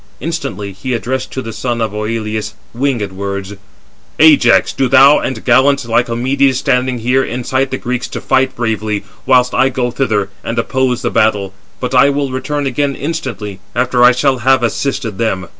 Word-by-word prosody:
Instantly 135 - -4
he 120 +6 -3
addressed 130 +2 -3
to 130 - -4
the 115 - -6
son 120 +2 -3
of 110 -2 -1
Oïleus 110 0 -3 0.2
winged 120 -5 -1
words: 100 +1 -5 0.6
"Ajax, 155 -1 +5
do 135 - 0
thou 135 +3 +6
and 130 - -4
gallant 130 +2 +3
Lycomedes, 125 +3 +1
standing 130 -2 0
here, 125 +3 +1
incite 130 +2 -2
the 130 - -3
Greeks 125 0 -3
to - - -6
fight 130 0 +1
bravely, 110 -3 -2 0.2
whilst 125 -1 +3
I 130 - +3
go 125 -1 -2
thither 110 -6 -1
and 115 - -4
oppose 130 -2 0
the - - -1
battle; 100 -3 +1 0.3
but 125 +1 -3
I 135 +2 +5
will 140 -1 -1
return 145 +2 -3
again 140 +1 -1
instantly, 120 - -5 0.2
after 125 0 +2
I 125 - +8
shall 130 +1 +1
have 130 +1 +3
assisted 115 -3 -2
them." 95 -6 -1
125 Hz, 170 wpm, -15 LUFS, 110-135 Hz, 0.6 s, I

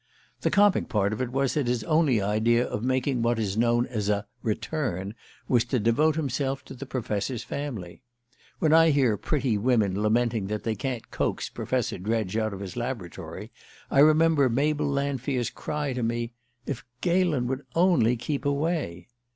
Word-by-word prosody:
The - - +1
comic 205 -1 +3
part 100 -1 +1
of 110 - -3
it 125 - -1
was 135 0 +1
that 145 -5 0
his 120 -1 0
only 155 -7 +3
idea 115 +4 +2
of 105 - -4
making 130 0 0
what 120 0 +1
is 100 -3 -1
known 120 +1 +2
as 105 -5 -3
"a 105 0 0 0.2
return" 110 - -2 0.3
was 120 -3 +3
to 125 +1 0
devote 125 +8 +3
himself 135 -2 -2
to - - -9
the 135 +1 -8
Professor's 115 -1 -2
family. 120 -12 -6 0.6
When 155 -1 +2
I 165 0 +7
hear 135 -7 +3
pretty 130 -2 0
women 105 -4 +2
lamenting 110 -1 +1
that 105 +1 -3
they 115 - 0
can't 120 +3 -4
coax - - -1
Professor - - -2
Dredge 110 0 -1
out 110 -1 0
of 100 0 -7
his 95 -3 -6
laboratory 120 -8 -5 0.4
I 140 - +3
remember 155 -2 +5
Mabel 145 +4 +1
Lanfear's 140 -3 -1
cry 150 -3 -3
to 125 - -3
me: 120 +1 -2 0.3
"If 135 -4 -4 0.2
Galen 175 -7 +2
would 130 +2 -2
only 165 -10 +4
keep 140 +3 -3
away!" 140 - -1
125 Hz, 170 wpm, -26 LUFS, 110-140 Hz, 0.6 s, I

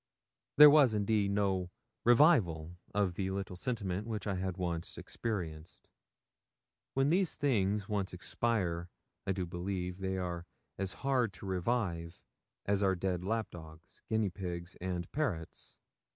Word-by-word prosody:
There 150 0 +11
was, 140 -7 +6
indeed, 105 -1 +2
no 95 -3 +1 0.4
revival 110 - +4 0.2
of 100 -3 +1
the 95 +1 -2
little 95 -1 -3
sentiment 100 -1 -2
which 110 -2 -3
I 100 - 0
had 95 0 -2
once 85 -2 -3
experienced. 85 -8 -5 1.1
When 135 +2 +3
these 185 0 +2
things 105 -7 +1
once 100 -3 -1
expire, 90 -2 -1 0.4
I - - +2
do 95 -1 -1
believe 90 +1 -4
they 95 0 -2
are 90 -1 -4 0.3
as 95 -1 -2
hard 125 -6 +2
to - - -10
revive 90 -3 -1 0.5
as 100 0 +1
our 95 -1 +3
dead 90 0 -1
lap 110 +1 -1
dogs, 80 -1 -13
guinea 110 -3 +1
pigs, 85 -2 -5
and 90 -1 -2
parrots. 95 - -3
95 Hz, 135 wpm, -33 LUFS, 90-110 Hz, 1.1 s, There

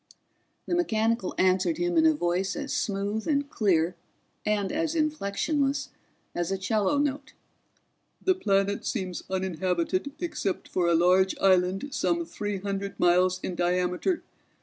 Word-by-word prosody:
The - - -3
mechanical 230 - 0
answered 185 -3 +2
him 175 0 0
in 160 -1 +5
a 160 - +5
voice 175 +4 0
as 285 -1 -4
smooth 205 +2 -2
and 285 -2 +1
clear 180 - +1 0.5
and 205 -2 +1
as 320 +1 -1
inflectionless 290 -1 0 0.4
as 175 +1 -2
a 195 - 0
'cello 205 +6 +1
note. 285 -2 -1 0.9
"The 375 - +3
planet 200 - 0
seems 185 -6 -3
uninhabited 185 - -1
except 270 - -3
for 180 -2 0
a 170 - +4
large 185 +3 +3
island 190 +6 +2
some 340 +3 0
three 205 -9 -4
hundred 195 0 -4
miles 180 +1 +3
in 185 - -3
diameter. 180 - 0
195 Hz, 135 wpm, -27 LUFS, 180-270 Hz, 0.9 s, in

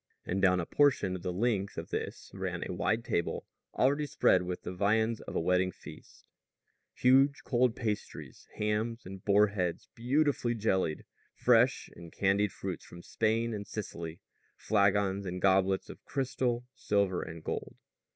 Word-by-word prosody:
And 95 +2 -1
down 90 -1 +4
a 85 - -2
portion 130 - +2
of 90 - -6
the 90 - -2
length 100 0 -1
of - - -6
this - - -5
ran - - -3
a - - -4
wide 115 +2 0
table 85 - -1 0.3
already 145 +3 +2
spread 130 -9 +3
with 90 0 -5
the 90 - -5
viands 110 +4 +1
of - - -8
a - - +2
wedding 90 +2 +2
feast - - -14 0.7
huge 135 +2 +4
cold 125 -2 +2
pasties, 110 -4 -5
hams 110 +2 -1
and 95 0 -9
boarheads 100 -4 +2
beautifully 125 0 +1
jellied, 95 -8 0 0.3
fresh - - +3
and 85 -1 -11
candied 100 +1 +1
fruits 95 -2 -5
from 85 0 -12
Spain 115 +1 0
and 100 -1 -5
Sicily, 85 -4 -6 0.3
flagons 100 -1 +1
and 90 +1 -4
goblets 95 0 +2
of - - -11
crystal, 125 -3 -1
silver, 100 -6 0
and 80 0 -8
gold. - - -4
100 Hz, 150 wpm, -31 LUFS, 95-115 Hz, 0.7 s, down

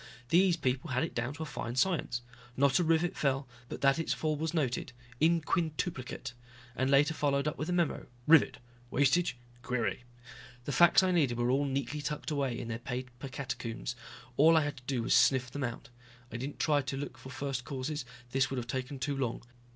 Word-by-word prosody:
These 175 +2 +4
people 130 -3 -1
had 130 +2 +1
it 165 - -3
down 120 +4 -2
to 160 - -4
a - - -4
fine 120 -5 -5
science. 130 -6 +1 0.3
Not 140 +2 +4
a - - +3
rivet 165 +1 +2
fell, 135 -1 0 0.2
but - - -6
that 140 +3 +4
its 165 - 0
fall 155 -1 -1
was 155 +1 -2
noted 135 -6 -1 0.3
in 165 +2 +4
quintuplicate. 150 -5 -2 0.4
And 130 +1 +1
later 140 +3 +4
followed 140 -1 +1
up 150 - -1
with 155 - -2
a - - 0
memo, 175 -3 0 0.2
rivet, 160 -2 +6 0.3
wastage, 140 +2 +2 0.2
query. 125 0 -1 0.6
The - - -2
facts 175 +5 +6
I 185 - +2
needed 140 -9 +2
were 120 +1 +1
all 140 +2 +2
neatly 140 +2 -2
tucked 150 +1 -3
away 135 -5 0
in 120 - -5
their 115 0 -3
paper 125 +1 -6
catacombs. 125 -3 -4 0.4
All 160 +3 +7
I - - +5
had 145 -1 -3
to 125 - -12
do 130 -4 0
was - - +2
sniff 130 -2 +4
them 145 +1 -4
out. 120 -1 -4 0.4
I - - -4
didn't 135 +4 -5
try 150 -2 +3
to 135 0 -4
look 145 +1 -5
for 130 - -10
first 130 -1 -3
causes, 135 +3 -3 0.3
this 135 +1 +2
would 135 - -3
have 120 - -2
taken 130 +3 -4
too 140 +2 -2
long. 125 -4 -2
140 Hz, 205 wpm, -31 LUFS, 130-155 Hz, 0.6 s, All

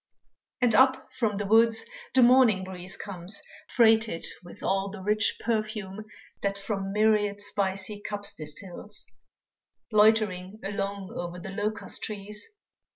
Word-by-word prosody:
And 245 -2 +4
up 260 +1 +4
from 230 -5 0
the 205 +1 -2
woods 225 - +4 0.3
the 260 - +7
morning 240 -6 +6
breeze 185 0 -6
Comes 190 0 -5 0.3
freighted 220 -6 +4 0.2
with 175 - -12
all 195 +1 +1
the 205 0 -8
rich 210 +3 +1
perfume 215 -2 -2 0.4
That 200 0 -1
from 195 -1 -3
myriad 210 -1 +2
spicy 200 0 -2
cups 205 -1 -2
distils, 180 +6 -8 0.9
Loitering 210 -2 +3
along 200 -1 -3
o'er 175 0 -5
the 190 +2 -7
locust 210 +3 -2
trees. 210 0 -6
205 Hz, 125 wpm, -28 LUFS, 195-220 Hz, 0.9 s, the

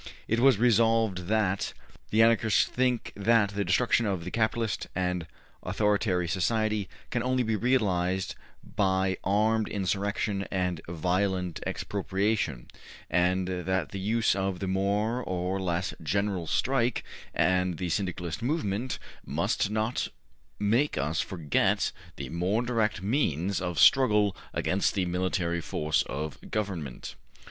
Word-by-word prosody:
'' - - -25
It 115 - +1
was 130 -2 +5
resolved 115 -5 +3
that 105 -3 0 0.4
``the 110 +1 +5
Anarchists 115 -2 +4
think 125 -2 -1
that 105 0 +3
the 100 0 -1
destruction 120 0 +2
of 95 -4 -1
the 90 - -6
capitalist 110 -1 0
and 90 -2 -1 0.3
authoritary 100 -2 +1
society 105 +3 0 0.2
can 120 - 0
only 130 +1 +1
be 110 -1 0
realized 95 -6 +1 0.3
by 95 -1 0
armed 110 +3 +2
insurrection 100 +1 -1
and 90 -3 -1
violent 90 +1 0
expropriation, 100 - -1 0.4
and 90 +2 +2
that 95 -1 -1
the 100 - -5
use 110 +3 +2
of 95 -1 -1
the 95 - -4
more 100 +5 0
or 90 0 -2
less 90 0 -1
General 95 +1 -1
Strike 125 - +1 0.3
and 90 -2 +2
the 90 -2 -3
Syndicalist 90 -3 -2
movement 125 -3 -1 0.3
must - - 0
not 110 +3 -1 0.5
make 115 +8 +1
us 75 +3 0
forget 80 -6 0 0.2
the - - -6
more 90 +8 0
direct 115 -5 0
means 100 - 0
of 90 -3 -3
struggle 105 -7 +5 0.2
against 95 +1 0
the 95 -2 +1
military 90 -1 -1
force 75 -1 0
of 75 +3 -4
government.'' 90 - -4
100 Hz, 130 wpm, -28 LUFS, 90-110 Hz, 0.5 s, was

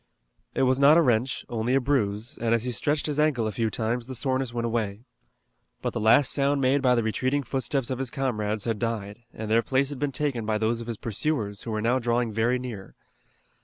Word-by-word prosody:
It - - +2
was 130 0 +3
not 145 +3 +7
a - - +6
wrench, 125 0 0
only 120 +2 -1
a - - +5
bruise, 115 -5 -1
and 115 0 +2
as 115 - -2
he 125 - -2
stretched 145 +6 0
his 150 -1 -1
ankle 150 -7 +2
a 110 - -1
few 115 +1 -1
times 115 +2 -2
the 130 - -6
soreness 130 +1 -1
went 120 0 -2
away. 110 -3 -2 0.8
But - - -1
the - - -2
last 110 +5 +5
sound 140 0 +2
made 135 +1 +2
by 125 -2 +4
the 115 - +1
retreating 130 +6 0
footsteps 135 0 -1
of 130 - -2
his 135 -2 -2
comrades 110 -6 -2
had 115 -3 -2
died, 110 -3 -3
and 110 0 -6
their 115 +1 +5
place 135 +3 +1
had 145 -3 -6
been 145 -1 -1
taken 135 -4 -1
by 110 0 0
those 115 +2 0
of 115 - -8
his 115 -2 -4
pursuers, 110 -2 -2
who - - -6
were 110 0 -2
now 125 +3 +2
drawing 120 -1 0
very 115 +3 +1
near. 115 -7 -8
120 Hz, 230 wpm, -26 LUFS, 110-135 Hz, 0.8 s, not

